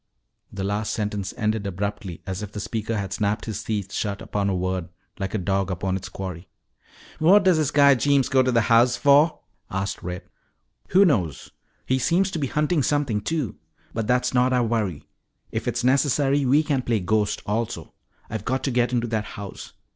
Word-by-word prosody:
The 95 - -5
last 105 +2 -1
sentence 105 -3 -2
ended 110 -3 -1
abruptly 100 -2 -4
as 95 0 -4
if 105 -1 -6
the 105 - -6
speaker 110 +1 -3
had 100 -2 -3
snapped 105 0 -1
his 110 - -4
teeth 100 -3 -3
shut 100 -2 -2
upon 100 -1 -2
a 95 - 0
word 90 -1 -2 0.3
like 95 +1 -3
a - - +2
dog 95 0 0
upon 95 +1 -2
its 95 0 -5
quarry. 90 -1 -7 0.7
"What 190 +6 +6
does 185 -3 +4
this 155 -3 +1
guy 140 -1 +6
Jeems 140 +1 +2
go 135 -1 +4
to 130 0 +1
the 115 -1 +3
house 120 +1 +4
for?" 145 +3 +4 0.3
asked 95 +1 -3
Red. 90 0 -5 0.6
"Who 195 +2 +5
knows? 95 - 0 0.3
He 130 0 +1
seems 180 +8 +2
to 165 - -3
be 140 - 0
hunting 150 +3 +1
something 135 -7 0
too. 155 -2 -2 0.4
But 110 -2 -2
that's 125 +1 +1
not 125 +1 +3
our 125 -1 +3
worry. 110 -9 -2 0.4
If - - -3
it's - - -1
necessary, 140 +1 +2
we 145 +5 +4
can 145 -4 0
play 115 -3 0
ghost 105 +2 0
also. 110 +2 -3 0.3
I've 110 -3 -5
got 130 +2 -1
to 135 - 0
get 120 0 +1
into 120 -1 0
that 110 -2 -2
house. 100 -2 -8
110 Hz, 190 wpm, -24 LUFS, 100-135 Hz, 0.7 s, What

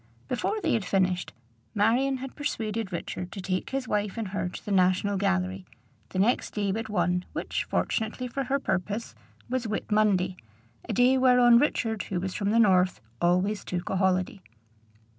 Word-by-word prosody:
Before 335 - -1
they 330 - +1
had 225 - +1
finished, 185 -1 0 0.4
Marion 245 +6 +2
had 265 0 -7
persuaded 225 -8 -3
Richard 180 +1 -5
to - - -6
take 185 -1 -2
his 265 -1 -3
wife 210 0 -1
and 220 -4 -3
her 190 -2 -2
to - - -10
the 205 - -4
National 185 +1 +3
Gallery, 190 -1 0 0.5
the - - -6
next 210 +6 +1
day 205 -2 0
but 220 +2 -3
one, 180 -2 +1
which, - - -2
fortunately 225 +3 -1
for 270 +2 -3
her 270 +3 +1
purpose, 205 -2 -2 0.3
was 250 -2 -2
Whit 215 0 -4
Monday, 190 -4 +2 0.5
a - - 0
day 255 +2 +4
whereon 250 -2 +6
Richard, 225 -6 0
who 185 - -2
was 185 +1 -3
from 200 -1 -1
the 220 - +2
north 185 -5 +4 0.2
always 185 +4 +2
took 175 0 -4
a 190 - 0
holiday. 190 +3 +1
205 Hz, 175 wpm, -27 LUFS, 185-235 Hz, 0.5 s, whereon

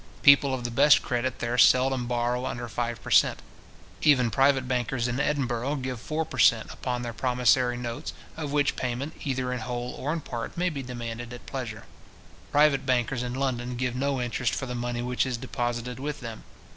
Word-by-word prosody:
People 140 -1 +7
of 130 -2 -2
the 120 - -3
best 145 +5 +5
credit 125 0 -1
there 120 +1 -1
seldom 130 -1 +4
borrow 120 +1 0
under 120 0 -4
five 120 0 -3
per - - -7
cent. - - +5 0.6
Even 130 -6 +4
private 135 0 +3
bankers 125 -1 -1
in 120 +2 -2
Edinburgh 135 -2 0
give 130 -3 -4
four 155 +6 -2
per - - -7
cent. 115 -1 +4
upon 125 -1 -3
their 120 -1 -4
promissory 125 0 +2
notes, 120 -1 -5 0.2
of 150 -3 -4
which 145 -1 +2
payment, 130 +5 -3
either 130 -2 -1
in 125 - -3
whole 120 +1 -4
or 145 - -3
in 165 0 -2
part 120 0 -6
may 180 +1 +1
be 140 -3 -4
demanded 120 -1 -6
at 120 - -10
pleasure. 115 -6 -5 0.7
Private 145 -2 +4
bankers 125 -1 0
in 125 0 -3
London 125 -2 -2
give 125 0 -2
no 135 +1 0
interest 120 0 -1
for 135 - -3
the 125 - -5
money 120 0 -3
which 125 0 0
is 130 -3 -2
deposited 120 0 -3
with 145 +2 -4
them. 115 -3 -8
125 Hz, 195 wpm, -27 LUFS, 120-135 Hz, 0.7 s, People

